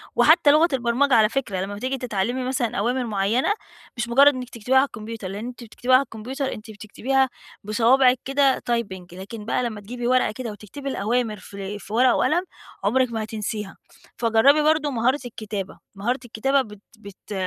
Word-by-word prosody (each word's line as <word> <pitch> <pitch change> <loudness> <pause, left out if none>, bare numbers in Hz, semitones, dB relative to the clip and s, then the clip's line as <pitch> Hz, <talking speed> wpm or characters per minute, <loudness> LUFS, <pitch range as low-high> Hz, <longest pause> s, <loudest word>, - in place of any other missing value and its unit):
وحتّى 290 - +6
لغة 310 +3 +5
البرمجة 255 +2 +1
على 220 -2 +5
فكرة، 255 -3 -3
يعني 185 - -1
لمّا 205 +1 -6
بتيجي 260 +6 -3
تتعلّمي 245 +1 -2
مثلًا 255 -3 -1
أوامر 245 +5 0
معيّنة، 215 - +1 0.4
مش 235 0 -2
مُجرّد 280 +4 +6
إنِّك 250 -1 -6
تكتبيها 245 +3 0
على 265 - +6
الكمبيوتر، 225 -5 -7
لإن 205 +5 -6
أنتِ 245 -1 -9
بتكتبيها 245 +3 -2
على 265 - +5
الكمبيوتر 260 +3 -5
أنتِ 220 0 -10
بتكتبيها 260 +6 0 0.3
بصوابعِك 250 +4 +4
كده 275 0 +2
typing، 190 -7 -3
لكن 205 +4 -8
بقى 240 - 0
لمّا 220 -4 -4
تجيبي 240 +3 -5
ورقة 255 -3 +3
كده 235 0 -6
وتكتبي 215 +7 -8
الأوامر 225 -1 -1
في 200 +1 -7
في 210 - -10
ورقة 250 +2 +4
وقلم، 350 +4 +2 0.4
عُمرِك 255 +3 +2
ما 220 -1 -2
هتنسيها. 210 -2 -5 0.4
فجَرّبي 235 +6 +4
برضه 310 -1 +2
مهارة 255 +3 +1
الكتابة، 210 -4 -6 0.2
مهارة 240 +6 -1
الكتابة 270 +4 +1
بت 210 -4 -10 0.2
بت 200 0 -11
235 Hz, 175 wpm, -23 LUFS, 210-260 Hz, 0.4 s, وحتّى